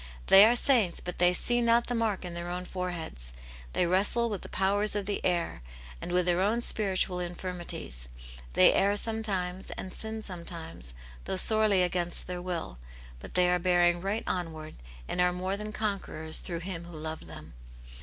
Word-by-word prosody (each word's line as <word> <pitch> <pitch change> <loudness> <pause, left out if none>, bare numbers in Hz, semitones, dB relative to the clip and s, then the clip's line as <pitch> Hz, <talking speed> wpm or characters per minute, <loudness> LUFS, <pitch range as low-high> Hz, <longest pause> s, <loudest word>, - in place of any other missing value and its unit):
They 195 +2 +9
are 235 - +3
saints, 240 -8 +3
but 180 - -7
they 180 0 +5
see 240 +7 +2
not 235 0 +3
the 245 - -3
mark 220 -5 -1
in 175 - -6
their 170 0 -5
own 180 +1 -4
foreheads; 170 - 0 0.4
they - - +2
wrestle 205 +6 +2
with 205 - -4
the - - -9
powers 205 +2 +2
of 205 -1 -2
the 205 0 -3
air, 170 - -1 0.4
and - - -5
with 180 0 +2
their 175 0 +1
own 220 +5 +1
spiritual 190 -5 +1
infirmities; 175 - -5 0.4
they - - +6
err 200 +1 +2
sometimes, 195 -5 -1
and 185 - -7
sin 220 0 -3
sometimes, 165 - -4 0.3
though - - -2
sorely 215 -1 +3
against 175 -1 0
their 180 -1 -5
will, 170 - -5 0.4
but - - -12
they 180 0 +4
are 180 0 +2
bearing 175 -1 +2
right 200 +4 -2
onward, 160 -3 -4 0.3
and 180 - -1
are 180 0 +3
more 185 +2 -3
than 210 +1 -6
conquerors 200 -7 -1
through 170 -2 -5
Him 175 -2 -6
who 170 -2 -10
loved 155 +1 -7
them. - - -11
180 Hz, 180 wpm, -29 LUFS, 175-205 Hz, 0.4 s, They